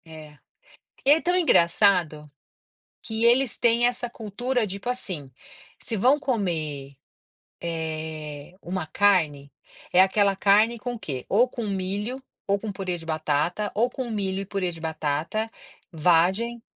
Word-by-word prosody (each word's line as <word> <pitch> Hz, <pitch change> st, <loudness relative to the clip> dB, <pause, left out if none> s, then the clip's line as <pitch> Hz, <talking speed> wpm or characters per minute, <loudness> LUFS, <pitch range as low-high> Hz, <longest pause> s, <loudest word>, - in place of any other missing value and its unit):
É, 155 Hz, -2 st, -12 dB, 0.7 s
e 275 Hz, -, +4 dB
é 305 Hz, +2 st, +6 dB
tão 355 Hz, +2 st, +1 dB
engraçado, 170 Hz, -, +3 dB, 0.7 s
que 220 Hz, 0 st, -2 dB
eles 245 Hz, +1 st, +4 dB
têm 235 Hz, 0 st, +3 dB
essa 245 Hz, 0 st, -1 dB
cultura, 240 Hz, +2 st, -2 dB
tipo, 200 Hz, +4 st, -6 dB
assim, 185 Hz, -, -3 dB, 0.5 s
se 225 Hz, -, -4 dB
vão 255 Hz, +8 st, +4 dB
comer, 160 Hz, -, -3 dB, 0.7 s
eh, 155 Hz, -2 st, -5 dB
uma 180 Hz, -2 st, -4 dB
carne, 155 Hz, -7 st, +2 dB, 0.4 s
é 180 Hz, -, +7 dB
aquela 195 Hz, +1 st, +2 dB
carne 210 Hz, +4 st, +4 dB
com 245 Hz, +3 st, -4 dB
o -, -, -7 dB
quê? 135 Hz, -, -5 dB
Ou 235 Hz, +6 st, +4 dB
com 235 Hz, -3 st, -5 dB
milho, 200 Hz, +6 st, -3 dB, 0.2 s
ou 200 Hz, 0 st, +1 dB
com 215 Hz, +1 st, -5 dB
purê 185 Hz, -3 st, -3 dB
de 165 Hz, -, -12 dB
batata, 155 Hz, +5 st, -1 dB
ou 230 Hz, +4 st, +2 dB
com 250 Hz, -1 st, -5 dB
milho 195 Hz, -3 st, -2 dB
e -, -, -8 dB
purê 190 Hz, -2 st, -2 dB
de 165 Hz, -1 st, -10 dB
batata, 160 Hz, +7 st, -2 dB, 0.4 s
vagem 185 Hz, +8 st, +2 dB
195 Hz, 145 wpm, -25 LUFS, 160-230 Hz, 0.7 s, é